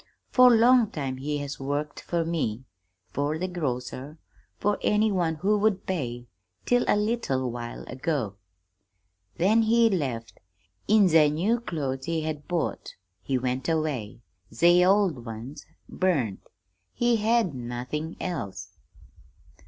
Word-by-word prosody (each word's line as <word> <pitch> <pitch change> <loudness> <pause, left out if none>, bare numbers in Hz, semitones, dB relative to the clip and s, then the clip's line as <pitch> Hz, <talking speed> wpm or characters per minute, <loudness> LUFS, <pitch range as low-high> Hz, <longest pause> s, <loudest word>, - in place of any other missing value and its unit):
For 255 -1 +7
long 235 -1 +5
time 135 -8 -4
he 145 +3 -2
has 145 0 -5
worked 145 +2 -3
for 170 -1 -1
me, 130 -9 -2 0.5
for 145 +3 -1
the 185 +3 -2
grocer, 145 -3 -4 0.4
for 205 0 0
any 210 +1 +2
one 170 -4 0
who 205 +6 +1
would 210 -2 +1
pay 120 -10 -3 0.4
till 245 0 +3
a - - +4
leetle 210 - -1
while 120 0 -6
ago. 130 - -3 1.0
Then 210 +6 +4
he 230 0 +4
left. 130 -10 -3 0.5
In 210 -2 +5
ze 160 -3 +5
new 190 +11 +1
clothes 140 - -4
he 165 -1 0
had 155 -2 -5
bought, 175 -2 -3 0.3
he 135 +4 -1
went 130 +3 -2
away. 145 -9 -2 0.3
Ze 175 +10 +5
old 185 - +3
ones 115 +5 -8 0.2
burned. 140 - 0 0.6
He 240 -1 +2
had 220 -5 +2
nothing 125 +6 -5
else.' 95 - -5
155 Hz, 130 wpm, -26 LUFS, 130-195 Hz, 1.0 s, For